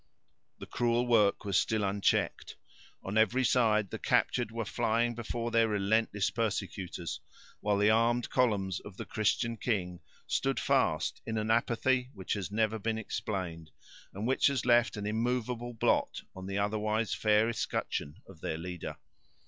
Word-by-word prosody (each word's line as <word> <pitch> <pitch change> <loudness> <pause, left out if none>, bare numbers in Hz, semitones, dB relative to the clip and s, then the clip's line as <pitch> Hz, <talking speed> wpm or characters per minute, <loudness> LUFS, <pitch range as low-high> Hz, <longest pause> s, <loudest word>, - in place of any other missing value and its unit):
The - - -8
cruel 120 0 +1
work 110 -5 +3
was 100 -2 +3
still 110 -2 0
unchecked. 100 0 0 0.5
On 100 +3 0
every 125 +4 +3
side 110 -6 +3
the - - -5
captured 120 -3 +1
were 115 0 -4
flying 115 +3 +1
before 120 0 -4
their 115 0 +4
relentless 105 0 +1
persecutors, 95 -7 -3 0.4
while 105 -1 +1
the 105 +1 +4
armed 115 +2 +2
columns 100 -7 +1
of 100 -2 -12
the - - -5
Christian 115 +2 0
king 90 -8 -2 0.3
stood - - 0
fast - - +1
in 110 - -2
an 110 +1 0
apathy 125 +2 +1
which 95 -2 -3
has 100 -3 -3
never 110 +1 0
been 110 +2 -1
explained, 95 -7 -4 0.4
and 100 +3 -5
which 130 +2 +3
has 140 -2 0
left 120 -2 +4
an 105 - -4
immovable 120 +2 -1
blot - - +1
on 95 0 -7
the 100 0 -3
otherwise 110 +2 0
fair 105 0 +3
escutcheon 90 -9 -3
of 90 -5 -14
their 80 - -2
leader. 90 +1 -6
110 Hz, 155 wpm, -31 LUFS, 100-115 Hz, 0.5 s, their